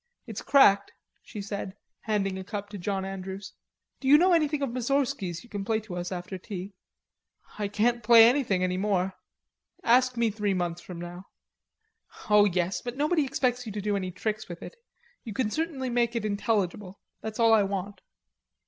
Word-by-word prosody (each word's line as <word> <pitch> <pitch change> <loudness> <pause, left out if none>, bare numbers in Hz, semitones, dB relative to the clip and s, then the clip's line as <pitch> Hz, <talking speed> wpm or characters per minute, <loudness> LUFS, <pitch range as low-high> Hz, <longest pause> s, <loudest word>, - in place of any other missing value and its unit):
It's - - -6
cracked," 200 -8 +5 0.3
she 205 - -8
said, 200 -1 -5 0.2
handing 195 -3 -1
a - - -6
cup 205 0 -6
to 205 -1 -7
John 190 +1 -2
Andrews. 195 0 -6 0.5
"Do 265 - -4
you 290 +2 +8
know 360 +3 +4
anything 300 -3 +2
of 270 - -1
Moussorgski's 245 - -1
you 240 - -17
can 205 -2 -3
play 220 +1 0
to 205 -4 -8
us 175 +1 -4
after 180 +1 -5
tea?" 195 0 -7 0.9
"I 205 - 0
can't 235 +4 +1
play 230 +1 +8
anything 235 -8 +2
any 180 0 0
more.... 190 -1 0 0.7
Ask 250 +1 +4
me 230 -2 +2
three 205 -2 -1
months 175 -1 -2
from 180 -2 -9
now." 175 +2 -8 1.1
"Oh, 210 0 +7
yes; 180 -1 0
but 245 +1 -6
nobody 305 +1 +2
expects 250 -2 -1
you - - -4
to 210 - -3
do 205 0 0
any 185 -2 -2
tricks 215 +4 -4
with 175 - -8
it. - - -9 0.5
You 220 - -6
can 220 -2 -1
certainly 285 -5 -2
make 240 0 +1
it 230 -2 -1
intelligible. 200 -2 -1 0.2
That's 220 0 -6
all 230 -1 +5
I 220 - +6
want." 195 0 -3
210 Hz, 185 wpm, -27 LUFS, 190-240 Hz, 1.1 s, you